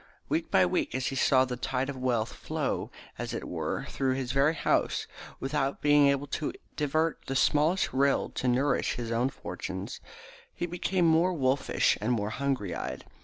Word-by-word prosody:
Week - - 0
by 95 - +5
week, 90 - -1
as 130 -1 -1
he 135 - -5
saw 130 0 +4
the 125 -1 -4
tide 130 +1 -2
of 140 - -4
wealth 125 -3 0
flow - - -3 0.3
as - - -3
it - - -5
were - - -3
through 130 -1 0
his 130 -2 -2
very 140 +4 +3
house - - +1 0.3
without 135 0 -1
being 145 -1 +5
able 140 0 +1
to 150 +1 -3 0.2
divert 155 +2 0
the 135 - -2
smallest 150 +7 +2
rill 140 +1 +2
to 125 - -2
nourish 130 +4 +2
his 115 -1 -4
own 120 +3 +1
fortunes, 95 +1 -6 0.5
he - - -2
became 175 +1 0
more 165 +3 +4
wolfish 135 -3 +1
and 115 +4 +1
more 105 -2 -1
hungry 130 -9 -1
eyed. 65 -5 -5
135 Hz, 175 wpm, -29 LUFS, 125-145 Hz, 0.5 s, by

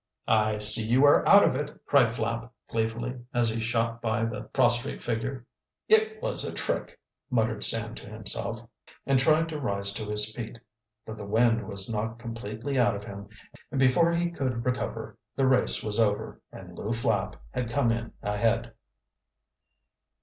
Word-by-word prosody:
"I 110 -1 +2
see 105 +1 +6
you 130 +5 +4
are 145 - +5
out 200 0 +8
of - - +1
it!" 145 +2 -5
cried 125 -5 +4
Flapp 115 +1 -3 0.2
gleefully, 120 +3 -3
as 120 -1 +3
he 115 +1 -3
shot 115 0 -1
by 115 0 0
the 115 - -4
prostrate 120 0 +1
figure. 125 +2 -3 0.4
"It 440 0 +3
was - - -2
a - - -4
trick!" - - -3 0.3
muttered 110 -4 0
Sam 115 0 +2
to - - -10
himself, 110 +2 -3 0.4
and 135 -1 +3
tried 155 +4 +3
to 155 -2 -5
rise 100 -5 -2
to 110 +1 -5
his 105 +1 -1
feet. 115 0 -7 0.5
But 110 0 -8
the 100 - -7
wind 115 +2 +2
was 100 -2 -3
knocked 115 +1 -3
completely 115 +3 -4
out 120 -3 +3
of 100 - -7
him 100 0 -9 0.4
and 135 - -3
before 135 +6 +4
he 170 0 0
could 130 -7 -3
recover 125 0 -3 0.2
the 135 - +1
race 130 -1 +4
was 105 0 -1
over, 105 -2 0
and - - -11
Lew 110 +3 -3
Flapp 110 -4 -1 0.2
had 125 -2 -3
come 120 -1 +1
in 115 0 -3
ahead. 115 +3 0
115 Hz, 170 wpm, -27 LUFS, 110-130 Hz, 0.5 s, out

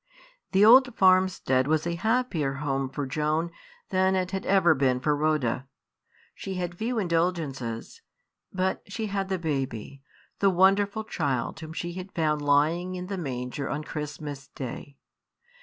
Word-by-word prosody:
The 195 +2 +5
old 250 +1 +7
farmstead 185 -9 +3
was 155 +1 +1
a 170 - -1
happier 195 - 0
home 135 -1 -2
for 145 +1 -4
Joan 155 +4 -1 0.4
than 190 0 +3
it 185 -1 -1
had 190 -1 -4
ever 185 -4 +5
been 130 -3 +1
for 150 +3 +1
Rhoda. 145 -4 0 0.7
She 190 - -6
had 175 -1 -3
few 230 +6 -2
indulgences, 165 - -2 0.5
but 190 0 -1
she 220 +3 -4
had 195 -1 -1
the 190 - 0
baby, 135 -5 -3 0.4
the 200 - +4
wonderful 195 +3 +3
child 140 - -2
whom 160 0 -8
she 175 +1 -4
had 185 +2 -7
found 155 -2 +1
lying 155 +6 +2
in 180 0 -5
the 195 +1 -4
manger 130 -2 -4
on 150 +1 -3
Christmas 150 -2 -6
Day. 135 +1 -8
165 Hz, 150 wpm, -27 LUFS, 140-190 Hz, 0.7 s, old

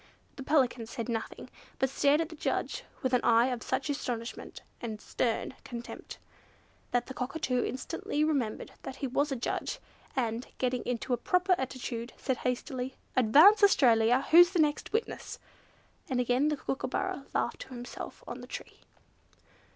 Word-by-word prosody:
The - - -8
Pelican 260 -5 +2
said 230 0 -5
nothing, 225 -2 -4 0.3
but 265 - +2
stared 285 +3 +3
at 325 - -3
the 325 - -9
judge - - -2 0.2
with 260 -1 0
an 250 - +4
eye 235 +2 +5
of 245 -2 -3
such 270 - -1
astonishment 245 -5 -4 0.2
and 220 -3 -4
stern 235 +3 -1
contempt, 240 -1 -8 0.7
that 245 0 +1
the 260 - -7
Cockatoo 250 -1 -1
Instantly 295 +2 -2
remembered 275 -8 -1
that 265 - -6
he 280 - -4
was 285 +3 0
a - - 0
judge, 240 - -2 0.4
and, 235 -2 -1
getting 250 -1 0
into 245 +1 -1
a - - +2
proper 360 +9 +2
attitude, 250 -4 -4
said 260 -2 -1
hastily, 250 +1 -3 0.2
"Advance 295 - +7
Australia! 245 - +5
Who's 345 +2 +9
the - - +1
next 300 -1 +1
witness?" 445 +1 -2 0.7
And 255 -2 0
again 250 +4 +2
the 300 -1 0
Kookooburra 275 +5 -3
laughed - - 0
to - - -8
himself 245 -2 -8
on - - -7
the - - -10
tree. - - -8
255 Hz, 160 wpm, -30 LUFS, 240-290 Hz, 0.7 s, Who's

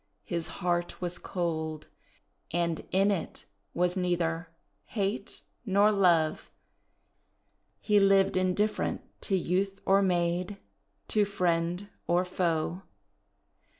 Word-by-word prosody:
His 170 -1 -2 0.2
heart 175 -1 0
was 180 0 -3
cold, 160 -3 -3 0.6
and 170 -1 -1
in 195 +2 +3
it 185 -5 -4 0.3
was 180 +1 +1
neither 175 -2 -1 0.4
hate 200 0 -3 0.2
nor 205 -1 +4
love. 170 -6 +2 1.3
He 210 -1 +3
lived 195 -1 +4
indifferent 185 +3 0 0.2
to 195 - 0
youth 190 +3 -1
or 195 +1 +5
maid, 180 +1 0 0.5
to 210 - +3
friend 180 -1 0 0.2
or 175 +1 +2
foe. 175 -1 -1
180 Hz, 100 wpm, -29 LUFS, 170-195 Hz, 1.3 s, or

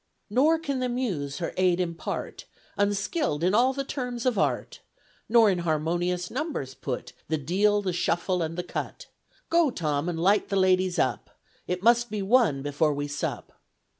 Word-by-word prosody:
Nor 295 +8 +4
can 285 -5 -3
the 255 0 -1
muse 185 - -2
her 170 - -3
aid 180 -1 +3
impart, 170 -2 -4 0.3
Unskilled 205 - 0
in 185 +2 +2
all 245 +4 +4
the 275 +1 -3
terms 250 -3 -4
of 250 -2 +2
art, 200 - -1 0.5
Nor 230 -1 +6
in 180 - -1
harmonious 175 +2 -1
numbers 260 - -3
put 130 -2 -5
The 160 - 0
deal, 205 +8 +1
the 185 -2 -1
shuffle, 175 +1 0
and 165 +1 -3
the 180 - -2
cut; - - -5 0.5
Go, 335 -3 +4
Tom, 155 - -1
and 165 -2 -3
light 195 +4 +3
the 200 - -1
ladies 185 -1 +2
up, 125 -4 -1 0.3
It 180 +1 -3
must 240 +1 +4
be 210 -2 -3
one 195 - +3
before 145 +1 +1
we 145 0 -3
sup. 145 0 -4
185 Hz, 170 wpm, -26 LUFS, 165-240 Hz, 0.5 s, Nor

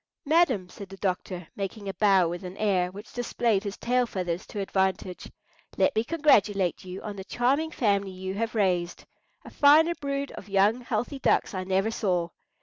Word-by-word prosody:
"Madam," 280 - +3
said 195 +2 -10
the 195 - -10
doctor, 185 -2 -3
making 200 +1 -5
a 195 - -3
bow 195 -2 +4
with 175 +2 -5
an 180 +1 -8
air 190 -4 +1
which 205 +3 -11
displayed 230 -4 0
his 200 -2 -5
tail 250 0 +1
feathers 180 -3 -3
to 210 - -6
advantage, 190 -2 -2 0.5
"let - - +2
me 220 - +2
congratulate 210 - +2
you 185 +1 -7
on 210 -2 -5
the 190 - -7
charming 265 +10 0
family 200 - 0
you 190 0 -5
have 230 +3 -3
raised. 180 -4 0 0.4
A - - -10
finer 310 +4 +5
brood 280 -2 -3
of 200 - -10
young, 200 +5 +3
healthy 245 +4 -3
ducks - - +2
I 185 -1 -3
never 190 +3 +1
saw. 180 -6 0
200 Hz, 180 wpm, -27 LUFS, 185-240 Hz, 0.5 s, finer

